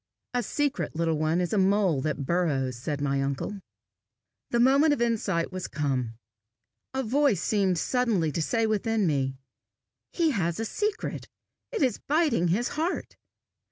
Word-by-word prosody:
"A 245 Hz, -, +1 dB
secret, 285 Hz, -, -1 dB
little 165 Hz, -1 st, 0 dB
one, 155 Hz, +2 st, +1 dB
is 180 Hz, +2 st, -1 dB
a 210 Hz, -, +3 dB
mole 190 Hz, -6 st, +3 dB
that 150 Hz, -1 st, -2 dB
burrows," 140 Hz, -7 st, 0 dB
said 140 Hz, +4 st, -4 dB
my 140 Hz, -1 st, +1 dB
uncle. 140 Hz, +9 st, -3 dB, 0.9 s
The 235 Hz, -, +1 dB
moment 275 Hz, +5 st, +5 dB
of 290 Hz, -, -2 dB
insight 210 Hz, -8 st, 0 dB
was 185 Hz, -1 st, -4 dB
come. 130 Hz, -6 st, -2 dB, 0.8 s
A 265 Hz, -, 0 dB
voice 260 Hz, -, +2 dB
seemed 195 Hz, -4 st, +2 dB
suddenly 215 Hz, -7 st, +1 dB
to 165 Hz, -, -2 dB
say 225 Hz, +7 st, +1 dB
within 220 Hz, 0 st, +1 dB
me, 135 Hz, -4 st, 0 dB, 0.8 s
"He 330 Hz, -3 st, +2 dB
has 170 Hz, -, -1 dB
a 225 Hz, -, -1 dB
secret; 420 Hz, -, -3 dB, 0.4 s
it 455 Hz, -11 st, 0 dB
is 250 Hz, -5 st, +1 dB
biting 295 Hz, -, +2 dB
his 215 Hz, +8 st, +1 dB
heart!" 325 Hz, +4 st, -2 dB
195 Hz, 155 wpm, -27 LUFS, 155-245 Hz, 0.9 s, moment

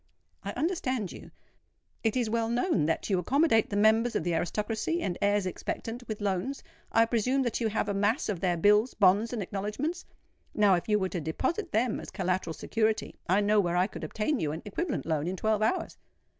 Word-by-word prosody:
"I -, -, -4 dB
understand 260 Hz, -, -1 dB
you. -, -, -11 dB, 0.7 s
It 225 Hz, +2 st, +1 dB
is 240 Hz, -3 st, +1 dB
well 225 Hz, +1 st, 0 dB
known 240 Hz, -, +1 dB
that 160 Hz, -, -1 dB
you 190 Hz, -, +3 dB
accommodate 255 Hz, -, +3 dB
the 205 Hz, -, -3 dB
members 220 Hz, +3 st, +3 dB
of -, -, 0 dB
the 175 Hz, 0 st, 0 dB
aristocracy 215 Hz, -, -1 dB
and 180 Hz, -, -1 dB
heirs 205 Hz, -1 st, +2 dB
expectant 230 Hz, +6 st, -5 dB
with 215 Hz, -1 st, -5 dB
loans; 200 Hz, +7 st, -2 dB, 0.3 s
I 230 Hz, -, +5 dB
presume 250 Hz, +4 st, +1 dB
that 240 Hz, -1 st, -2 dB
you 225 Hz, -, +2 dB
have 215 Hz, 0 st, -1 dB
a 200 Hz, -, 0 dB
mass 205 Hz, +6 st, +1 dB
of 200 Hz, -5 st, -2 dB
their 175 Hz, -1 st, +1 dB
bills, 210 Hz, +7 st, +4 dB
bonds, 205 Hz, +3 st, +4 dB
and 230 Hz, -5 st, -2 dB
acknowledgments? 210 Hz, -, -3 dB, 0.5 s
Now 205 Hz, -2 st, +5 dB
if 175 Hz, +4 st, -1 dB
you 210 Hz, -, +4 dB
were 190 Hz, -2 st, -1 dB
to 175 Hz, -, -3 dB
deposit 265 Hz, -, -2 dB
them 230 Hz, +1 st, +1 dB
as -, -, -8 dB
collateral 185 Hz, -3 st, -2 dB
security, 220 Hz, -1 st, -1 dB
I 190 Hz, +3 st, +4 dB
know 210 Hz, +1 st, +3 dB
where 175 Hz, -3 st, +1 dB
I 180 Hz, -, +4 dB
could -, -, -8 dB
obtain 240 Hz, +6 st, -1 dB
you 150 Hz, -, -1 dB
an 160 Hz, -, -7 dB
equivalent 285 Hz, -, -3 dB
loan 160 Hz, -1 st, -1 dB
in 185 Hz, -, -2 dB
twelve 215 Hz, +2 st, 0 dB
hours." 225 Hz, +12 st, -1 dB
210 Hz, 205 wpm, -29 LUFS, 190-235 Hz, 0.7 s, I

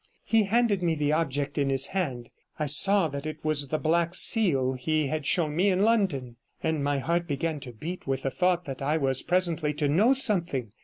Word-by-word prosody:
He 225 Hz, -2 st, +2 dB
handed 215 Hz, -2 st, +1 dB
me 170 Hz, -2 st, 0 dB
the 150 Hz, -1 st, 0 dB
object 145 Hz, -2 st, -2 dB
in 140 Hz, -1 st, 0 dB
his 135 Hz, 0 st, +3 dB
hand. 130 Hz, -11 st, -3 dB, 0.3 s
I 155 Hz, -, -2 dB
saw 190 Hz, +5 st, +4 dB
that 140 Hz, +1 st, -6 dB
it 155 Hz, -, -8 dB
was 150 Hz, -2 st, +1 dB
the 155 Hz, -, -2 dB
black 170 Hz, +2 st, 0 dB
seal 140 Hz, -, +3 dB
he 155 Hz, +4 st, -1 dB
had 150 Hz, +1 st, -3 dB
shown 155 Hz, -4 st, +1 dB
me 190 Hz, +5 st, +2 dB
in 190 Hz, +1 st, +1 dB
London, 175 Hz, -, 0 dB, 0.3 s
and 160 Hz, -3 st, -1 dB
my 145 Hz, 0 st, 0 dB
heart 170 Hz, +5 st, -1 dB
began 155 Hz, +1 st, -3 dB
to 130 Hz, -3 st, -9 dB
beat 160 Hz, +11 st, -8 dB
with 135 Hz, -1 st, -2 dB
the 135 Hz, -, -2 dB
thought 180 Hz, +1 st, 0 dB
that 135 Hz, -1 st, -7 dB
I 150 Hz, +3 st, 0 dB
was 135 Hz, -3 st, -1 dB
presently 170 Hz, -4 st, -1 dB
to 150 Hz, -1 st, -1 dB
know 205 Hz, -, +3 dB
something. 175 Hz, -, -1 dB
155 Hz, 210 wpm, -26 LUFS, 140-180 Hz, 0.3 s, saw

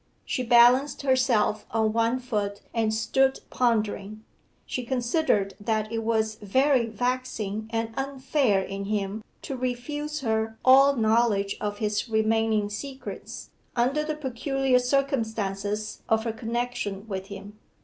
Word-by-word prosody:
She -, -, -2 dB
balanced 245 Hz, +4 st, +5 dB
herself 255 Hz, -6 st, +2 dB
on 220 Hz, -1 st, +1 dB
one 230 Hz, +2 st, +2 dB
foot 205 Hz, -5 st, -3 dB
and 225 Hz, -2 st, +1 dB
stood 265 Hz, +5 st, +1 dB
pondering. 215 Hz, -3 st, 0 dB, 0.4 s
She 255 Hz, -, -4 dB
considered 240 Hz, -4 st, 0 dB
that 215 Hz, +1 st, -1 dB
it 225 Hz, -, -1 dB
was 220 Hz, -1 st, 0 dB
very 260 Hz, +4 st, +2 dB
vexing 220 Hz, -2 st, -2 dB
and 225 Hz, 0 st, -2 dB
unfair 270 Hz, -6 st, +1 dB
in 195 Hz, +1 st, -5 dB
him 205 Hz, +1 st, -2 dB, 0.2 s
to 270 Hz, -, -4 dB
refuse 290 Hz, +5 st, -3 dB
her 220 Hz, -2 st, -1 dB
all 275 Hz, +2 st, +7 dB
knowledge 220 Hz, -3 st, +2 dB
of 205 Hz, -1 st, -2 dB
his 210 Hz, +2 st, -1 dB
remaining 220 Hz, -1 st, +2 dB
secrets, 265 Hz, +6 st, -7 dB, 0.2 s
under 260 Hz, +5 st, +1 dB
the 310 Hz, 0 st, -2 dB
peculiar 270 Hz, -1 st, 0 dB
circumstances 220 Hz, -6 st, -1 dB
of 220 Hz, 0 st, +3 dB
her 225 Hz, -1 st, -2 dB
connection 225 Hz, -3 st, -3 dB
with 190 Hz, -2 st, -5 dB
him. 200 Hz, +1 st, -10 dB
225 Hz, 130 wpm, -26 LUFS, 215-255 Hz, 0.4 s, all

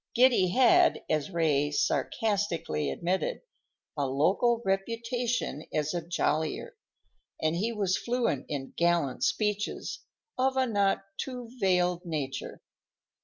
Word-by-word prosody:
Giddy 245 Hz, -6 st, +5 dB
had, 345 Hz, -, +4 dB
as 155 Hz, +3 st, 0 dB
Ray 155 Hz, -5 st, +1 dB
sarcastically 165 Hz, -, 0 dB
admitted, 185 Hz, -, -1 dB, 0.5 s
"a 145 Hz, -2 st, 0 dB
local 195 Hz, -, +2 dB
reputation 230 Hz, -, -1 dB
as 155 Hz, +1 st, -1 dB
a 175 Hz, -, -1 dB
jollier," 160 Hz, -, -1 dB, 0.6 s
and 155 Hz, +1 st, +1 dB
he 215 Hz, +7 st, 0 dB
was 200 Hz, -4 st, 0 dB
fluent 235 Hz, -, -1 dB
in 135 Hz, -3 st, -4 dB
gallant 170 Hz, -6 st, +1 dB
speeches 210 Hz, -1 st, -1 dB, 0.4 s
of 265 Hz, +1 st, +2 dB
a 260 Hz, -, +3 dB
not 200 Hz, -5 st, +1 dB, 0.2 s
too 250 Hz, -3 st, -5 dB
veiled 180 Hz, -3 st, +2 dB
nature. 145 Hz, -6 st, -4 dB
185 Hz, 115 wpm, -29 LUFS, 155-235 Hz, 0.6 s, Giddy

